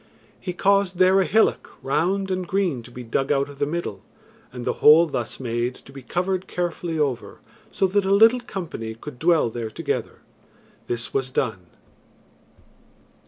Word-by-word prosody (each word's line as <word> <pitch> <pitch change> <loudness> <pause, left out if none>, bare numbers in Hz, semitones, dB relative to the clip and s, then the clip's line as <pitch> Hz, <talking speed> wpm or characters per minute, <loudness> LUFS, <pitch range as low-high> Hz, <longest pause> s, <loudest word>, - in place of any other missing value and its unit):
He 180 - -4
caused 195 0 +2
there 185 +1 +5
a - - +1
hillock, 220 +5 +2
round 190 +8 0
and 185 -1 -2
green, 185 -10 0
to 115 - -13
be 125 0 -9
dug 135 +4 -1
out 140 0 +1
of 140 -1 -12
the 145 - +1
middle, 170 +3 -4 0.5
and 125 -1 -7
the - - +1
hole 155 +3 +8
thus 155 - -4
made 120 0 -2
to - - -16
be 135 0 -10
covered 185 +7 -2
carefully 175 -1 -3
over 135 -6 -2 0.3
so - - +1
that 195 +1 +1
a 190 - +1
little 225 +5 +6
company 165 - -6
could 125 +2 -10
dwell 160 -7 +3
there 115 -1 -4
together. - - -4 0.7
This 120 0 -4
was 130 -1 0
done. 110 -9 -2
160 Hz, 165 wpm, -23 LUFS, 125-185 Hz, 0.7 s, hole